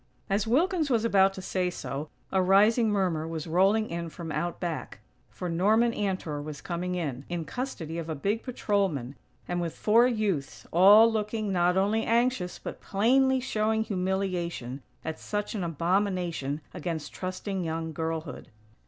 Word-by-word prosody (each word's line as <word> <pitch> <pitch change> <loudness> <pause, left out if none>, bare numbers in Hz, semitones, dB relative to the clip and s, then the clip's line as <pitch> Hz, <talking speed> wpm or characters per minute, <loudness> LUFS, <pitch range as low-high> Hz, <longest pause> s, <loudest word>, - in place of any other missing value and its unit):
As 200 +2 +1
Wilkins 315 - +2
was 230 -3 +2
about 195 -3 +5
to 190 - -7
say 185 -1 0
so, 150 -3 -5 0.2
a 190 - +3
rising 210 +5 +4
murmur 180 -6 0
was 160 -2 -4
rolling 195 +6 +3
in 170 0 -4
from 165 0 -7
out 170 +3 -2
back, 165 - -4 0.3
for 180 - -6
Norman 210 +8 +3
Antor 185 -8 -2
was 150 -1 -7
coming 180 +1 -3
in, 140 -7 -3
in 170 -2 -3
custody 170 - -4
of 165 -1 -6
a 160 - -2
big 200 +10 -1
patrolman, 195 - -1 0.3
and 175 0 -1
with 170 -2 -4
four 230 +3 +5
youths, 205 - -2
all 205 +6 +8
looking, 215 -1 -1
not 180 0 +2
only 210 +4 +2
anxious, 230 -6 +1
but - - -8
plainly 260 +6 +3
showing 220 -3 0
humiliation 180 - -2 0.2
at 160 0 -4
such 205 0 -3
an 205 -5 -2
abomination 170 -3 -1
against 165 -2 -4
trusting 185 +1 -4
young 160 0 -3
girlhood. 160 -1 -4
185 Hz, 155 wpm, -28 LUFS, 165-215 Hz, 0.3 s, all